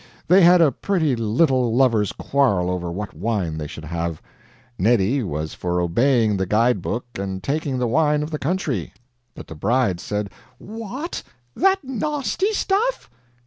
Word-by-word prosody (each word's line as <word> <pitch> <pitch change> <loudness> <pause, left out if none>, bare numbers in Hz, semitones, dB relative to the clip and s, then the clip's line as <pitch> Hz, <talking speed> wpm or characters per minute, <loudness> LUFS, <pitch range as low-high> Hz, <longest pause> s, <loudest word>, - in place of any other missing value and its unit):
They 185 +4 +6
had 175 0 +7
a 155 -4 +5
pretty 160 -2 0
little 120 +1 +1
lovers' 115 -6 +3
quarrel 100 -11 +1
over 90 -1 -3
what 100 +4 -5
wine 90 -3 -2
they 75 - -4
should 80 +1 -9
have. 85 0 -3 0.6
Neddy 115 +5 +2
was 80 -6 -4
for 90 0 -2
obeying 110 +4 +2
the 95 0 -1
guide 110 +1 +2
book 120 +7 -3
and 95 -1 -4
taking 145 -2 -1
the 125 - 0
wine 150 +4 +2
of 150 - -6
the 150 - -3
country; 140 - -2 0.4
but - - -9
the - - -9
bride 115 +2 +1
said: 105 +1 -3 0.3
"What, 230 - -6 0.3
that 385 -1 +2
nahsty 295 - -1
stuff!" 430 +4 -1
120 Hz, 155 wpm, -22 LUFS, -, 0.6 s, had